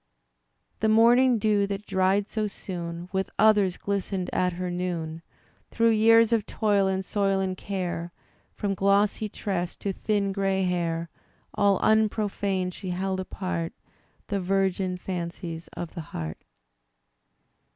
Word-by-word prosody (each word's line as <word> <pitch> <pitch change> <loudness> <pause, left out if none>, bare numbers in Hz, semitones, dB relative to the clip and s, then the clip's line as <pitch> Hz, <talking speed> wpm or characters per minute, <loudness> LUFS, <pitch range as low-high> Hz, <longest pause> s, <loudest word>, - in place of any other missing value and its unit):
The 220 - +2
morning 240 +3 +5
dew, 210 -1 +2
that 200 +1 -4
dried 195 +1 +2
so 215 -1 -1
soon 175 -3 -6
With 190 0 -1
others, 205 -4 +4
glistened 195 -2 -2
at 180 -1 +1
her 180 +1 -3
noon; 170 -3 -3 0.5
Through 230 0 +3
years 225 +1 +5
of 220 -3 +1
toil 205 -3 +2
and 190 0 -1
soil 195 -1 +1
and 190 -1 -1
care. 180 -3 -4 0.4
From 200 -1 -1
glossy 200 +2 +2
tress 180 -4 -3
to 200 - -3
thin 200 0 0
gray 195 -1 0
hair. 170 -2 -1 0.4
All 200 -2 +3
unprofaned 205 -4 +1
she 190 0 -7
held 190 +1 -1
apart 185 -2 -3 0.5
The 200 -2 -2
virgin 190 0 0
fancies 170 -2 -5
of 170 - -5
the 170 - -5
heart. 80 - -6
195 Hz, 130 wpm, -26 LUFS, 180-205 Hz, 0.5 s, morning